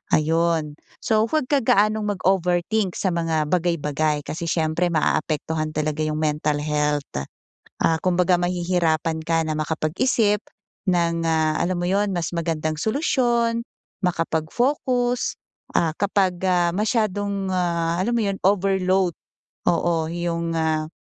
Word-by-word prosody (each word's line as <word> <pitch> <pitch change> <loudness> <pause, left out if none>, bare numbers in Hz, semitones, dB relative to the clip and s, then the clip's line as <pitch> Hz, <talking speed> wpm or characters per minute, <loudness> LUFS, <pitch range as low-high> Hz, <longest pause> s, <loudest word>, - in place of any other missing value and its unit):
ayun. 160 -1 +1 0.3
So, 220 -1 +3
huwag 310 -5 0
ka 285 - +4
gaanong 215 0 +3
mag-overthink 185 +2 +1
sa 190 - 0
mga 160 -3 0
bagay-bagay 155 -4 0
kasi 170 +2 -4
siyempre 160 +2 +1
maaapektuhan 155 0 0
talaga 155 0 -1
yung 155 0 -2
mental 150 -1 0
health, 150 -1 0 0.8
ah, 160 -1 +3
kumbaga 180 0 +3
mahihirapan 170 -3 0
ka 165 0 +1
na 155 - -1
makapag-isip 195 - +1 0.5
ng, 170 -1 +1
ah, 155 -1 +2
alam 185 +1 0
mo 175 - 0
'yon 200 +1 +1
mas 175 -2 -2
magandang 160 -2 -1
solusyon, 235 -3 +1 0.4
makapag-focus, 245 - 0 0.4
ah 165 - +2
kapag, 190 -2 +1
ah, 175 -2 +3
masyadong, 205 -2 0
ah, 170 -2 0
alam 235 +5 0
mo 230 - +1
'yon 195 -1 -1
overload, 190 -2 +2 0.6
oo, 165 -1 +1
yung, 170 -1 -2
ah 155 -1 0
175 Hz, 125 wpm, -23 LUFS, 160-195 Hz, 0.8 s, ka